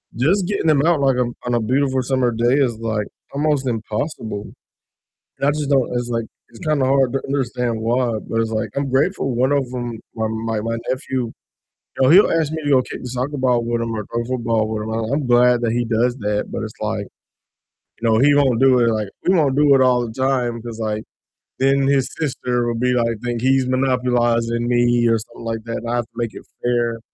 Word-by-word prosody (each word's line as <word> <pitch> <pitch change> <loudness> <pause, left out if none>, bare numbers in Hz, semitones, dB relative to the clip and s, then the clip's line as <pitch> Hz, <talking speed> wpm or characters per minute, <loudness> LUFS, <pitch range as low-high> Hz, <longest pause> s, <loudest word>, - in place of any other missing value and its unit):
just 175 - +2
getting 200 -5 0
'em 145 -1 +3
out, 165 -3 +3
like, 135 -2 +3
on 120 -1 0
on 120 - -1
a - - +2
beautiful 130 +3 +1
summer 130 -1 +1
day 120 +2 +1
is, 120 -5 +1
like, 110 -2 -2 0.3
almost 145 -1 0
impossible, 110 -2 -4 0.8
and 140 - 0
I - - +4
just 150 -1 -3
don't 135 -3 +2
it's, 120 0 -2
like 115 -1 -1 0.2
it's 115 - -15
kinda 150 -4 +1
hard 135 -1 +3
to 135 - 0
understand 125 -4 -2
why, 120 0 0
but 115 - +1
it's, 110 -1 -2
like 110 -1 -2
I'm 140 0 -1
grateful 135 -1 0
one 130 +3 +2
of 140 -2 +2
‘em, 120 -2 -4 0.2
my 110 -1 -1
my 110 -1 -2
my 115 +1 -2
nephew, 130 -2 -2 0.7
you - - 0
know, 130 - +5
he'll 190 +6 +7
ask 160 -3 +1
me 160 - -4
to 145 - 0
go 130 -2 +5
kick - - -8
the 125 - -6
soccer 130 +4 -3
ball 125 -2 +2
with 120 0 -1
him 115 0 -3
or 105 -2 -4
throw 120 0 -2
a - - -7
football 115 -3 0
with 110 -1 -3
him, 110 - -5
and 110 +2 -2
I'm 145 -2 -1
glad 125 0 +4
that 115 -2 +1
he 120 +1 0
does 120 +2 +1
that, 105 -2 -1
but - - -4
it's - - -10
like, - - -2 1.0
you 115 - +1
know, 110 - +4
he 145 +3 +5
won't 130 -5 +3
do 130 -2 +5
it, 120 -1 +3
like 110 -3 -1 0.2
we 185 - +5
won't 145 -6 +2
do 145 -1 +5
it 135 - +4
all 125 -1 +3
the 110 - -7
time, 125 -3 0
'cause, 115 -1 -8
like, 110 -1 -2 0.6
then 135 0 +3
his 140 -2 +2
sister 125 -5 -1
will 120 - -1
be 125 +1 +2
like 115 -2 0
think 120 -1 -2
he's 130 0 +2
monopolizing 120 -2 +1
me, 120 -1 +3
or 115 0 +3
something 115 +1 -11
like 115 -1 -3
that, 115 0 -3
and 115 - -6
I 120 - 0
have 120 - 0
to - - -37
make 115 -2 -2
it - - -9 0.2
fair, 120 -1 0
120 Hz, 230 wpm, -20 LUFS, 115-135 Hz, 1.0 s, he'll